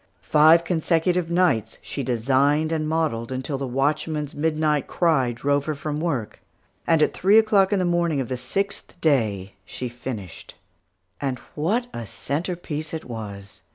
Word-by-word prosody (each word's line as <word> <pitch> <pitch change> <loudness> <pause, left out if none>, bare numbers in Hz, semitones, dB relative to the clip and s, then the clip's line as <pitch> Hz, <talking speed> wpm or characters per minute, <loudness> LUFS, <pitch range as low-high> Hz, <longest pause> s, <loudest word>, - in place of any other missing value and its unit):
Five 160 +2 +6
consecutive 170 +1 +1
nights, 170 - +1
she 140 - -4
designed 135 +5 +2
and 155 -1 -1
modelled 150 -8 -1
until 130 +2 -3
the 135 - -3
watchman's 150 +3 -1
midnight 155 -1 0
cry 155 -8 +2
drove 140 +4 0
her 155 - -2
from 150 +1 -4
work, 145 -10 -3 0.5
and 165 -2 +4
at - - +1
three 200 +4 +4
o'clock 210 -3 +4
in 205 - +3
the 185 - +1
morning 170 -4 +1
of 130 - -2
the 130 - -2
sixth 195 +8 -4
day, 110 - +1
she 125 - -6
finished. 115 -7 -8 0.7
And 135 -3 -1 0.2
what 205 +11 0
a 115 -2 -6
centrepiece 155 - -4
it 160 - -6
was! 100 -4 -8
150 Hz, 155 wpm, -24 LUFS, 130-165 Hz, 0.7 s, Five